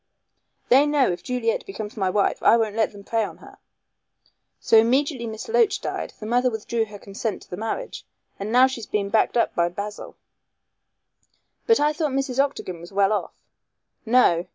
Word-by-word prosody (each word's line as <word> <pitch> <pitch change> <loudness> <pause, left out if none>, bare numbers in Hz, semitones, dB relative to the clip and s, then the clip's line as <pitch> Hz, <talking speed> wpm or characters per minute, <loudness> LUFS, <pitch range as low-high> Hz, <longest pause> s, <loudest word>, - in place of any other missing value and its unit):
They 275 +4 +6
know 290 -7 +2
if 175 0 -5
Juliet 235 +1 -1
becomes 210 +2 -7
my 195 -4 0
wife 200 +1 0
I 230 - +6
won't 220 -2 -1
let 225 -1 +1
them 200 -1 -13
prey 225 +2 0
on - - -6
her, - - -16 1.0
so - - +2
immediately 255 +2 +1
Miss 220 -1 -7
Loach 455 -2 +2
died - - -4
the 215 - -7
mother 245 +3 +2
withdrew 225 0 -2
her 210 -1 -11
consent 200 +2 -5
to - - -21
the - - -3
marriage, 225 - -5 0.4
and 200 +2 -4
now 250 +2 +6
she 260 -3 -3
is 215 - -9
being 200 -1 -1
backed 220 +3 +2
up 235 - +1
by 170 0 +1
Basil." 200 +4 -7 1.5
"But 455 -1 +5
I 300 +1 +2
thought 305 -3 -2
Mrs. 270 -1 -2
Octagon 185 -11 -5
was 175 - -11
well 200 +1 +2
off?" 210 - -3 0.7
"No. 220 -8 +3
225 Hz, 185 wpm, -23 LUFS, 205-260 Hz, 1.5 s, They